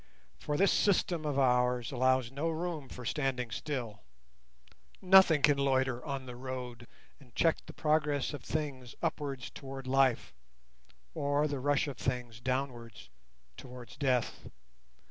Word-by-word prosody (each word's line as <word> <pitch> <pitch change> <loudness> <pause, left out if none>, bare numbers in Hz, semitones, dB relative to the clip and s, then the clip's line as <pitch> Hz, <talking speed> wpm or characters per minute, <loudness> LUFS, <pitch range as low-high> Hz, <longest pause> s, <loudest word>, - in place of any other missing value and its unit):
For 150 - -2
this 195 +2 +4
system 180 -5 +2
of 145 -2 -1
ours 125 -2 +2
allows 130 -1 +2
no 145 +5 -1
room 160 -4 -4
for 125 - -9
standing 125 -3 -1
still—nothing 110 - 0
can 145 -2 +5
loiter 130 -2 +1
on 140 -2 -4
the 125 -1 -8
road 125 -2 -6 0.3
and 125 -5 -20
check 165 -1 +3
the - - -9
progress 150 -2 +1
of 145 - -7
things 140 -6 -4
upwards 140 -5 -3
towards 135 -1 -8
Life, 130 -2 +2 0.8
or 145 0 +1
the 140 -2 -3
rush 145 +2 +1
of 140 - -5
things 125 -3 -3
downwards 120 - -4 0.5
towards 125 -3 -10
Death. 130 -4 -1
130 Hz, 130 wpm, -32 LUFS, 125-145 Hz, 0.8 s, can